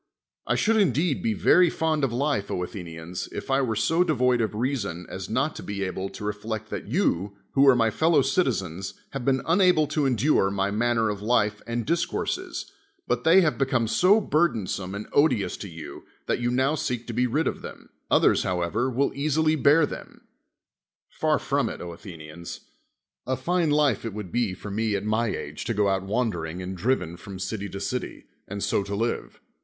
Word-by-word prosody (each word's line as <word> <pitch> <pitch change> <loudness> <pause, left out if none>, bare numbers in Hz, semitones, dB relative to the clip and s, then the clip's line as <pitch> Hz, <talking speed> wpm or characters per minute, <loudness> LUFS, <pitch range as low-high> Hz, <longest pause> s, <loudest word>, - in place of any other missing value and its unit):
I - - +2
should 225 +1 +2
indeed 175 -7 +2
be 110 -2 0
very 180 - +5
fond 160 -2 0
of 135 - +2
life, 125 -4 0
Athenians, 90 -1 -5
if - - -5
I 135 +1 +3
were 115 -4 0
so 160 +12 +2
devoid 125 -7 +2
of 110 -1 -1
reason 115 -8 -2
as 95 0 -6
not 130 +7 0
to - - -6
be 100 -1 -4
able 95 0 -3
to - - -9
reflect 110 +1 -4
that - - -5
you, 100 - 0 0.2
w^ho 140 +1 +5
are - - +3
my 115 -2 +2
fellow 160 +2 +3
citizens, 100 - -1 0.2
have 135 -2 -4
been 130 0 +1
unable 180 -2 +4
to 150 -3 +1
en 130 - +2
dure 115 -4 +3
my 100 0 -1
manner 115 0 +1
of 100 -1 -6
life 105 -2 +1
and 115 -1 -2
discourses, 170 +2 -2 0.4
but 125 0 0
they 170 +4 +7
have 155 -5 +1
become 130 -4 +1
so 185 - +4
burdensome 110 - 0
and 100 - -5
odious 145 -9 +3
to 100 - -7
you, 80 -4 -9 0.2
that - - 0
you 120 0 0
now 130 +4 +2
seek 125 -5 -2
to 120 - -6
be 125 +2 +2
rid 150 +7 0
of - - -2
them; - - -10 0.2
othex's, - - +4
however, 90 +7 0
will 130 +3 +1
easily 155 +3 +1
bear 150 +2 +5
them; - - -9 0.9
far - - +1
from - - 0
it, - - -7
Athenians. 85 -2 -9 0.7
A 130 0 0
fine 170 +5 +1
life 145 -6 +2
it 115 -3 -5
would 105 -5 -6
be 115 -6 0
for 100 +2 -8
me 110 0 0
at 100 - -3
my 110 +2 +1
age 75 -7 -4
to 115 - -1
go 100 -1 +2
out 95 0 +1
wandering 95 -6 -2
and 95 +1 -5
driven 90 -4 -1
from 95 +2 -9
city 100 +2 -4
to 100 - -6
city, 125 +6 -4 0.2
and 100 0 -5
so - - +1
to 100 +1 -4
live. 115 +3 -2
115 Hz, 195 wpm, -26 LUFS, 100-140 Hz, 0.9 s, they